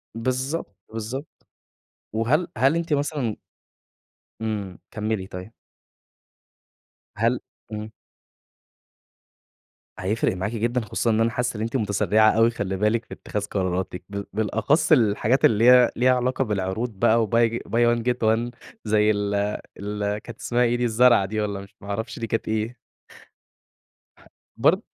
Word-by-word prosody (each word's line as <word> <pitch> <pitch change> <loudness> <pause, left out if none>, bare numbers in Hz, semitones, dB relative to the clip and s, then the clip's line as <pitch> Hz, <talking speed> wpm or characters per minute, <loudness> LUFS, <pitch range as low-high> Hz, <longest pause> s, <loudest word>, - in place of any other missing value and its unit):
بالضبط، 130 +7 -2 0.2
بالضبط. 120 +7 -6 0.7
وهل 120 +10 +1
هل 135 +6 +4
أنتِ 165 -2 -1
مثلًا 140 -6 -1 1.1
إمم. 105 -4 -3
كمِّلي 105 -3 -2
طيب. 90 +4 -8 1.7
هل 115 +3 +2 0.3
إمم. 105 0 -5 2.1
هيفرِق 100 +1 0
معاكِ 95 +4 -2
جدًا، 120 +2 0
خصوصًا 115 +2 -1
إن 110 - +2
أنا 115 - +3
حاسس 125 +1 -2
إن 105 - -4
أنتِ 115 +4 -3
متسرعة 110 -1 +3
أوي 115 +1 +4
خلّي 95 -4 -3
بالِك 110 +3 +1
في - - -10
اتخاذ 105 -1 -4
قراراتِك، 95 -2 -2
بال 100 0 -5
بالأخص 110 - +1
الحاجات 120 -1 +4
اللي 110 0 +4
هي 125 -1 +6
ليها 130 +1 +4
علاقة 130 +2 0
بالعروض 105 +2 -2
بقى 115 0 +4
وBuy 115 +1 +2
buy 120 0 +3
one 115 - -4
get 125 - -3
one 115 +2 +2 0.3
زي 105 0 +3
ال 100 -1 -1 0.4
ال 105 0 -2
كانت 110 +1 -10
اسمها 120 +1 +1
إيه 120 0 +2
دي 120 - -1
الزرعة 120 -2 +5
دي 110 +2 -2
والّا 100 -2 -2
مش 100 - -14
ما 100 - -10
أعرفش 110 +4 -4
دي 115 - -3
كانت 115 - -2
إيه. 110 +2 -1 1.8
بر - - +4
110 Hz, 140 wpm, -24 LUFS, 105-120 Hz, 2.1 s, هي